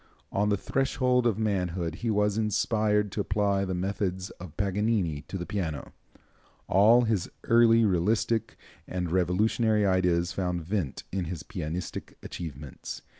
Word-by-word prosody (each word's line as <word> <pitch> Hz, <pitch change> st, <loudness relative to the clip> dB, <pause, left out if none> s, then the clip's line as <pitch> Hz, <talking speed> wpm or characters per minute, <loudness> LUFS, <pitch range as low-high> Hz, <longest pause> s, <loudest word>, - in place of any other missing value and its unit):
On 105 Hz, +1 st, +1 dB
the 100 Hz, -, +2 dB
threshold 130 Hz, +1 st, +1 dB
of 110 Hz, -, +1 dB
manhood 90 Hz, -6 st, -1 dB
he 120 Hz, -, -2 dB
was 105 Hz, -1 st, +2 dB
inspired 105 Hz, -1 st, +1 dB
to 105 Hz, -, -1 dB
apply 100 Hz, -1 st, +1 dB
the 95 Hz, -1 st, -2 dB
methods 95 Hz, 0 st, -2 dB
of 90 Hz, -4 st, -10 dB
Paganini 100 Hz, -5 st, 0 dB
to 95 Hz, -, -4 dB
the 90 Hz, -, -4 dB
piano. 85 Hz, -8 st, -4 dB, 0.7 s
All 110 Hz, +5 st, +6 dB
his 110 Hz, -6 st, 0 dB
early 115 Hz, -1 st, +5 dB
realistic 105 Hz, +4 st, +1 dB, 0.3 s
and 90 Hz, -2 st, -3 dB
revolutionary 105 Hz, +4 st, +2 dB
ideas 90 Hz, -2 st, +2 dB
found 90 Hz, -2 st, -2 dB
vent 90 Hz, -7 st, -2 dB
in 95 Hz, -2 st, -2 dB
his 80 Hz, -3 st, -5 dB
pianistic 80 Hz, +5 st, -5 dB
achievements. 75 Hz, -5 st, -7 dB
100 Hz, 135 wpm, -28 LUFS, 90-110 Hz, 0.7 s, All